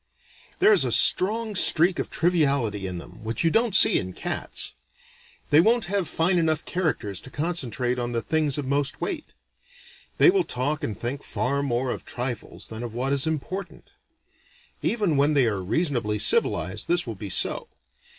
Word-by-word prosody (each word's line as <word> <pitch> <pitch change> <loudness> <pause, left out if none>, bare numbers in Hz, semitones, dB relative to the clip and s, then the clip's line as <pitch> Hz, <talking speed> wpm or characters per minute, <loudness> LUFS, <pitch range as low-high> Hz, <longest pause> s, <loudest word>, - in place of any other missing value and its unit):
"There 400 +3 +5
is - - +4
a - - -1
strong 220 +3 +3
streak 175 -1 +5
of - - -3
triviality 140 - 0
in 90 -1 -5
them, 90 +5 -12
which 110 +6 -2
you 165 - +2
don't 225 -1 +2
see - - +7
in 95 0 -6
cats. - - -3 0.8
They 150 +2 +7
won't 230 +5 +2
have 195 -4 0
fine 175 +3 +1
enough 160 -2 0
characters 125 - -2
to - - -12
concentrate 130 -6 -2
on 120 0 -3
the 115 -1 -2
things 155 +1 0
of 145 - -3
most 140 +1 -1
weight. 340 -6 -4 0.9
They 365 - +6
will 380 -1 +1
talk 145 - -2
and 105 - -4
think 130 +4 -4
far 140 +3 -2
more 125 -2 -1
of - - -6
trifles 125 -1 -6
than 110 +1 -7
of 120 -2 -7
what 130 +3 -1
is 140 +2 +1
important. 175 +5 -5 0.9
Even 205 -10 0
when 145 +2 +2
they 135 -3 +4
are 100 -4 -2
reasonably 120 - -1
civilized, 465 - +1
this 350 +1 +2
will - - -5
be - - -8
so. 475 - 0
145 Hz, 175 wpm, -24 LUFS, 120-180 Hz, 0.9 s, see